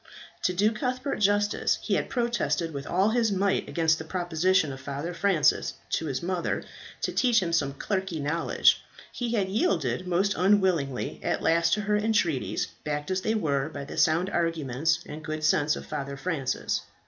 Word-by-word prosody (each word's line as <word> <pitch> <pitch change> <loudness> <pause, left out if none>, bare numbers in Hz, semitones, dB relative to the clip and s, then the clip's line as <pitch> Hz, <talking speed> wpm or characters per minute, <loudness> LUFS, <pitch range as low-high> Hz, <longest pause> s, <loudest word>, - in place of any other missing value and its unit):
To - - +1
do 205 +4 +3
Cuthbert 255 +4 -2
justice, 205 0 +2
he - - -2
had - - 0
protested 235 -9 0
with 140 0 -6
all 190 +4 +2
his 225 -1 +2
might 195 0 0
against 160 -1 +2
the - - -5
proposition 175 -1 +1
of 135 - -9
Father 140 +6 -4
Francis 175 -4 +2 0.2
to 160 - 0
his 135 0 -3
mother 175 -1 -1 0.4
to - - -1
teach 245 -3 +3
him 170 -4 -2
some 145 -4 +1
clerkly 190 0 -2
knowledge. 150 +4 +2 0.3
He 240 -1 -3
had 200 -4 +1
yielded 180 - 0
most 190 +3 +2
unwillingly 180 -9 +1
at - - -1
last 165 +1 +3
to 210 - -2
her 210 0 +1
entreaties, 205 - 0 0.2
backed 150 +3 -3
as 185 0 0
they 220 +3 0
were 145 -7 0
by 145 -3 -7
the - - -8
sound 170 +4 +2
arguments 160 -2 0
and 155 +1 -8
good 155 0 -4
sense 150 0 +3
of - - -8
Father 140 0 -5
Francis. 135 -4 -2
170 Hz, 175 wpm, -27 LUFS, 150-200 Hz, 0.4 s, do